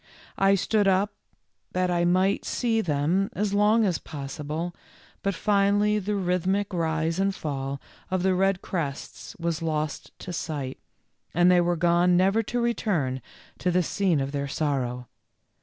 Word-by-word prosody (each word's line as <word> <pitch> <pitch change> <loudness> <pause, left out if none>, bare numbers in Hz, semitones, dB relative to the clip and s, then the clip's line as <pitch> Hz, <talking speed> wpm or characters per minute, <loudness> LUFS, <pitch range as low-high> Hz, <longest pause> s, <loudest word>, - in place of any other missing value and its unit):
I 195 0 +5
stood 205 +2 +1
up 195 +2 +2 0.6
that 185 0 +1
I 175 0 +2
might 185 +3 +2
see 230 -2 0
them 165 +4 +1
as 205 -1 -1
long 210 +2 +4
as 180 -5 0
possible, 150 +4 -5 0.5
but 195 -1 -1
finally 205 +2 +2
the 205 +1 -2
rhythmic 190 +2 0
rise 160 0 0
and 195 0 +1
fall 140 -3 -4 0.3
of 185 -1 0
the 190 0 +3
red 195 0 +1
crests 145 -7 -5
was 165 -1 -2
lost 155 -2 -2
to 180 - -7
sight, 145 -5 -4 0.6
and 175 +1 +5
they 180 -1 +5
were 175 0 +1
gone 175 +1 +3
never 195 +4 +3
to 240 +3 -3
return 180 - 0 0.4
to 180 - 0
the 180 0 +2
scene 180 -2 +1
of 135 0 -2
their 140 -1 -2
sorrow. 130 -4 -2
180 Hz, 155 wpm, -26 LUFS, 155-195 Hz, 0.6 s, I